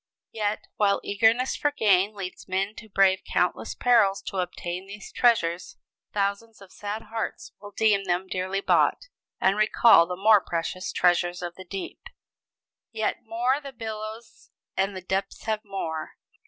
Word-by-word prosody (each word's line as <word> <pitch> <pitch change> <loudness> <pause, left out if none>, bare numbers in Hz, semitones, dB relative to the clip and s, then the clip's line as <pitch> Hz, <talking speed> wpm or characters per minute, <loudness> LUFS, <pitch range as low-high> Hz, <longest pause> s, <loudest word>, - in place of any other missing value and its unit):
Yet, 210 -1 -2
while 200 -1 +3
eagerness 225 +5 +2
for 290 - +1
gain 205 -5 +2
leads 190 -2 -7
men 195 +2 -1
to 220 - -11
brave 195 -1 +3
countless - - -1
perils 220 -6 +3
to 195 - -5
obtain 180 0 -4
these 200 +1 -10
treasures, 180 -8 +1 0.3
thousands 205 +2 -2
of 195 -2 -15
sad 210 +2 -5
hearts 225 0 -5
will 205 - -9
deem 205 -1 +2
them 180 +1 0
dearly 190 +1 -2
bought, - - +2 0.3
and 190 +2 +2
recall 215 -4 +6
the 180 - -3
more 205 +2 +5
precious 175 +2 -3
treasures 175 0 +2
of 175 -1 -4
the 185 +1 -11
deep. 190 +2 -6 0.9
"Yet 220 -1 -1
more! 245 +5 0
the 275 -2 -9
billows 220 0 -8 0.3
and 195 +1 0
the 185 - -6
depths 190 +2 -3
have 215 -1 -2
more! 165 -6 -5
200 Hz, 155 wpm, -26 LUFS, 185-220 Hz, 0.9 s, recall